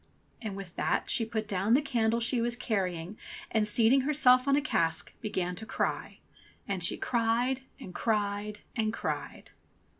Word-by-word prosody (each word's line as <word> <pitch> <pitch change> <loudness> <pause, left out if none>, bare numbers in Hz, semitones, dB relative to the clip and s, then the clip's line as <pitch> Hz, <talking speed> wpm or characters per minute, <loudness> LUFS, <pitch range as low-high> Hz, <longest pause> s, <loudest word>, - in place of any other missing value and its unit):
And 215 -4 -4
with 195 -3 -8
that - - 0
she 225 - +2
put 220 -1 -3
down 205 +3 +2
the - - +5
candle 235 -4 +1
she 235 +1 +2
was 235 0 +2
carrying 195 -6 -2 0.3
and 215 -2 +2
seating 230 +5 +4
herself 260 -2 +4
on 275 - +4
a - - +4
cask 170 - 0
began 180 -4 -2
to 220 - -6
cry. - - -2 0.5
And 195 -3 -2
she - - 0
cried 240 +2 +1 0.2
and 180 - -9
cried 210 -1 -1
and 220 -2 0
cried. - - -5
220 Hz, 160 wpm, -30 LUFS, 200-245 Hz, 0.5 s, the